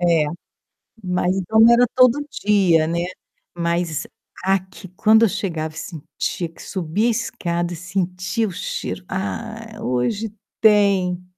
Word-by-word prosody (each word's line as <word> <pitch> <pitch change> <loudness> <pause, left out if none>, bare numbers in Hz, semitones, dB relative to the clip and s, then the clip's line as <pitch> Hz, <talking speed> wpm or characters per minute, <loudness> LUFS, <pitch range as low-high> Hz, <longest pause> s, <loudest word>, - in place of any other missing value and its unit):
É. 170 -3 +3 0.8
Mas 180 0 0
então, 215 +4 +1
não 230 +1 +8
era 245 +1 +5
todo 255 +2 +5 0.3
dia, 185 -6 +4
né, 170 +2 -1 0.5
mas 170 -2 -1 0.4
aqui 190 0 -1
quando 220 +4 +4
eu - - +2
chegava 165 -6 -3
e - - -12
sentia 165 +1 -4
que 165 - -16
subia 190 +5 -1
escada 175 -7 -2
e - - -5
sentia 185 +4 -2
o - - -5
cheiro: 180 +2 -4
"Ah, 220 +3 -5
hoje 130 - -1 0.3
tem". 200 -4 +3
185 Hz, 130 wpm, -21 LUFS, 170-215 Hz, 0.8 s, não